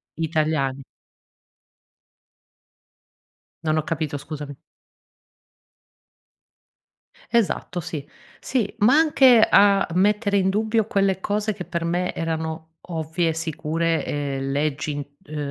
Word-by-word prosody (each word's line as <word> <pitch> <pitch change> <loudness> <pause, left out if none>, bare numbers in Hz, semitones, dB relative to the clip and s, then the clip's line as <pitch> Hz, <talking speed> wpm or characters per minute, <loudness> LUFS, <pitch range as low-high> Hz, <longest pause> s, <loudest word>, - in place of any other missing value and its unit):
italiani 155 -4 -1 2.8
Non 155 0 +1
ho - - 0
capito 155 -3 -3
scusami. 145 -1 -7 2.7
Esatto 220 -5 0
sì. 160 -4 -6 0.3
Sì, 235 -6 -1
ma 225 +6 +5
anche 265 -7 +6
a 200 -1 +5
mettere 200 +2 +2
in 190 0 +2
dubbio 220 +2 +1
quelle 195 -3 +1
cose 210 +2 -1
che 185 - -7
per 170 -1 -3
me 175 +2 -1
erano 160 0 -4 0.2
ovvie, 165 0 -1
sicure 165 +1 -1 0.4
uhm, 135 0 -3
leggi 145 +1 -1
int 145 -1 -5 0.2
uhm, 155 - -7
165 Hz, 100 wpm, -23 LUFS, 155-200 Hz, 2.8 s, anche